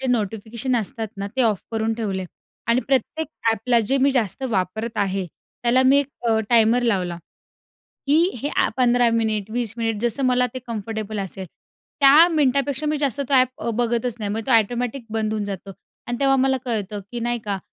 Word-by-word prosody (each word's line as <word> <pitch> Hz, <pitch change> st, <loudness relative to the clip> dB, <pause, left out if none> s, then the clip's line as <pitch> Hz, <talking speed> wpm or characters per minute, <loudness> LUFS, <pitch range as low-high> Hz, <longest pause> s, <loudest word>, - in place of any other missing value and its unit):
जे 265 Hz, -, -2 dB
नोटिफिकेशन 225 Hz, +3 st, -2 dB
असतात 225 Hz, +1 st, -2 dB
ना, 200 Hz, 0 st, -4 dB
ते 260 Hz, -, +3 dB
ऑफ 215 Hz, -5 st, +1 dB
करून 225 Hz, 0 st, 0 dB
ठेवले. 200 Hz, -5 st, -3 dB, 0.4 s
आणि 235 Hz, +2 st, +3 dB
प्रत्येक 290 Hz, +4 st, 0 dB, 0.2 s
अ‍ॅपला 230 Hz, +2 st, +2 dB
जे 270 Hz, -, +2 dB
मी 280 Hz, -, +4 dB
जास्त 245 Hz, -4 st, 0 dB
वापरत 220 Hz, +3 st, -2 dB
आहे, 195 Hz, -1 st, 0 dB, 0.4 s
त्याला 245 Hz, +2 st, +4 dB
मी 265 Hz, +2 st, +5 dB
एक 285 Hz, -, +1 dB, 0.2 s
अ, 220 Hz, -1 st, +3 dB
टाइमर 235 Hz, +1 st, +4 dB
लावला, 185 Hz, -7 st, 0 dB, 0.9 s
की 295 Hz, +3 st, +4 dB, 0.2 s
हे 290 Hz, -, -1 dB
अ‍ॅप -, -, 0 dB
15 245 Hz, -1 st, +4 dB
मिनिट, 220 Hz, -2 st, -1 dB
20 235 Hz, -2 st, -1 dB
मिनिट, 225 Hz, -2 st, -1 dB
जसं 240 Hz, +3 st, 0 dB
मला 250 Hz, 0 st, +3 dB
ते 255 Hz, -, -4 dB
कम्फर्टेबल 220 Hz, -1 st, -4 dB
असेल, 190 Hz, -1 st, -5 dB, 0.5 s
त्या 290 Hz, +4 st, +8 dB
मिनिटापेक्षा 285 Hz, -2 st, +1 dB
मी 300 Hz, 0 st, 0 dB
जास्त 280 Hz, -3 st, 0 dB
तो -, -, 0 dB
अ‍ॅप 255 Hz, -1 st, +5 dB
अ, 235 Hz, -, -2 dB
बघतच 235 Hz, 0 st, 0 dB
नाही. 205 Hz, -2 st, -3 dB
मग 220 Hz, +2 st, -2 dB
तो -, -, +1 dB
एटोमॅटिक 240 Hz, +3 st, -2 dB
बंद 215 Hz, -1 st, -1 dB
होऊन 215 Hz, -1 st, -2 dB
जातो. 195 Hz, -1 st, -6 dB, 0.4 s
आणि 240 Hz, 0 st, -2 dB
तेव्हा 270 Hz, -1 st, +4 dB
मला 265 Hz, 0 st, +2 dB
कळतं, 210 Hz, -4 st, -2 dB
की 240 Hz, -, -4 dB
नाही 240 Hz, +1 st, -1 dB
का, 200 Hz, -1 st, -1 dB
235 Hz, 190 wpm, -22 LUFS, 215-255 Hz, 0.9 s, त्या